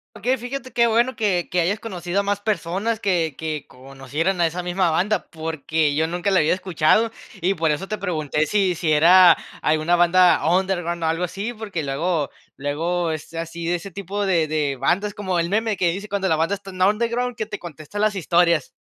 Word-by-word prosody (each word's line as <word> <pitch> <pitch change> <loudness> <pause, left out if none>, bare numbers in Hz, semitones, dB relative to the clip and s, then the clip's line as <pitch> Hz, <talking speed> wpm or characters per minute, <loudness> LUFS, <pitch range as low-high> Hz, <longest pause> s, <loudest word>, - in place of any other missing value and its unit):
Okey, 255 +3 0
fíjate 255 +2 -6
qué 235 -1 +4
bueno 235 +3 +2
que 195 -6 0
que 180 - +1
hayas 200 +6 0
conocido 185 -3 -2
a - - -6
más 205 0 -1
personas 205 +2 -1
que 170 -8 0
que 155 -2 -4
conocieran 135 +8 -3
a 170 - +4
esa 175 +2 -4
misma 180 0 +1
banda, 190 +7 0
porque 160 -1 -1
yo 160 +2 +1
nunca 175 +4 -1
la 190 - +4
había 155 +4 +3
escuchado, 185 +5 +2 0.3
y 185 +3 +2
por 160 -3 0
eso 165 +6 -1
te 215 -2 -4
pregunté, 155 -5 -1
si 195 0 +2
si 165 -1 -1
era 175 +3 +7 0.3
alguna 155 +3 +2
banda 175 +1 +4
underground, 175 -2 0
o, - - +1
algo 165 +2 0
así, 200 +7 -5
porque, 205 -8 -5
luego 145 +1 -1 0.3
luego 165 +4 -1
es 155 +1 -7
así 165 0 -5
de 175 - +1
ese 175 +3 -7
tipo 200 +2 -4
de 170 -5 +2
de 150 -3 -1
bandas 180 +10 0
como 190 -4 -2
el 170 - 0
meme, 220 0 0
que 175 -2 +2
dice 200 +4 -6
cuando 195 -1 -1
la 160 - +3
banda 165 +5 +1
está 195 -1 -11
en 185 0 -8
underground, 235 +4 +1
que 215 - -3
te 210 - -7
contesta 165 +3 -8
las 215 -1 +2
historias. 170 -4 +2
175 Hz, 205 wpm, -22 LUFS, 160-200 Hz, 0.3 s, era